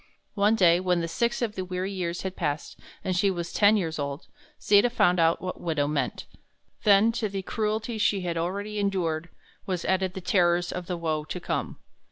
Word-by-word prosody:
One 210 +2 +3
day 175 -4 +5
when 180 -2 0
six 235 +7 -1
of 220 -3 -1
the 190 - -4
weary 185 +1 -3
years 175 -3 -3
had 190 -1 -4
passed, 150 -3 -3 0.3
and 185 - -1
she 200 +3 +3
was 175 -2 -4
ten 210 0 +5
years 160 -5 -2
old, 140 +1 -4 0.3
Sita 205 +4 +4
found 180 -7 +3
out 165 0 +3
what 185 - -5
widow 155 -4 0
meant. 150 -1 -2 0.6
Then, 205 +2 +6
to 230 -2 -2
the 195 -1 -4
cruelties 220 +2 -2
she 200 -2 +2
had 175 -2 -2
already 200 +5 -3
endured, 170 -5 -1 0.4
was 180 -3 -2
added 190 -1 0
the - - -3
terrors 175 -1 +2
of 180 -1 -5
the 180 - -2
woe 160 -2 -1
to - - -5
come. - - -3
185 Hz, 195 wpm, -26 LUFS, 170-205 Hz, 0.6 s, Then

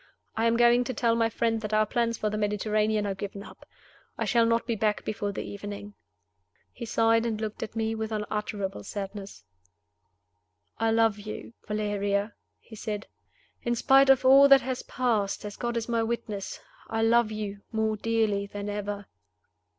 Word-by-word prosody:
I 225 - +1
am 230 0 +2
going 240 +1 +5
to 255 - -4
tell 230 0 +2
my 230 -1 +2
friend 225 0 0
that 215 0 -2
our 215 0 +4
plans 230 +2 0
for 210 - -1
the 215 - -2
Mediterranean 210 +1 +1
are 200 - -1
given 200 +1 -6
up. - - -14 0.5
I - - -1
shall 235 -1 +3
not 230 0 +1
be 235 - -1
back 210 0 0
before 205 -1 -2
the 195 - -4
evening." 205 0 -7 0.8
He 240 - -7
sighed, 225 0 +3
and 225 -2 -2
looked 215 -1 -4
at 220 0 -5
me 225 0 0
with 220 0 -4
unutterable 210 -2 -3
sadness. 200 0 -7 1.4
"I 225 0 +2
love 225 -2 +3
you, 215 +2 -8
Valeria," 205 0 -1 0.3
he 220 - -13
said. 210 -1 -4 0.6
"In 240 0 0
spite 270 +3 +5
of 265 -1 +5
all 275 +2 +8
that 275 -1 +7
has 260 0 -3
passed, 220 -6 -1
as 205 -1 -6
God 235 0 -2
is 230 - -2
my 230 -1 +1
witness, 225 -3 -3 0.3
I 225 0 -1
love 230 -1 +4
you 205 -2 -5
more 220 -1 0
dearly 215 -2 0
than 205 0 -5
ever." 205 0 -4
220 Hz, 175 wpm, -27 LUFS, 205-230 Hz, 1.4 s, all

